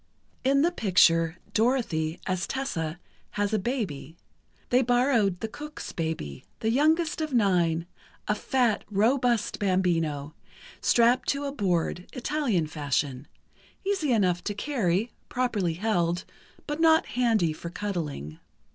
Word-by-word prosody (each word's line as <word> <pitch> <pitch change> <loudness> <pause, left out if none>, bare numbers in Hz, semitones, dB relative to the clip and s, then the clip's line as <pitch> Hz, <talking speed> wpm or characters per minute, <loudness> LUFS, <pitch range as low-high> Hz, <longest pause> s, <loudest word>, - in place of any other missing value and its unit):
In 275 +2 +3
the 345 - +3
picture, 170 - +3 0.2
Dorothy, 215 -10 +1
as 185 -1 -1
Tessa, 175 - -3 0.4
has 205 +1 0
a 215 - +2
baby. 190 - -3 0.5
They 250 +1 +5
borrowed 245 -6 +2
the 225 - -1
cook's 300 +6 -8
baby, 160 - -4 0.2
the 220 - 0
youngest 315 +5 +2
of 305 -4 -2
nine, 175 -6 +2 0.4
a - - +3
fat, 235 0 +1
robust 235 +2 +1
bambino, 165 -7 0 0.5
strapped 240 +2 +3
to 280 0 0
a 280 - -2
board, 180 - -1
Italian 250 - 0
fashion; 145 -3 -2 0.6
easy 385 -8 0
enough 185 -6 +2
to 205 - -2
carry, 215 -4 0 0.2
properly 215 -10 0
held, 175 -3 0 0.4
but 295 +1 -3
not 320 -1 +5
handy 225 -10 +1
for 170 +2 -7
cuddling. 160 - -4
205 Hz, 125 wpm, -27 LUFS, 170-255 Hz, 0.6 s, They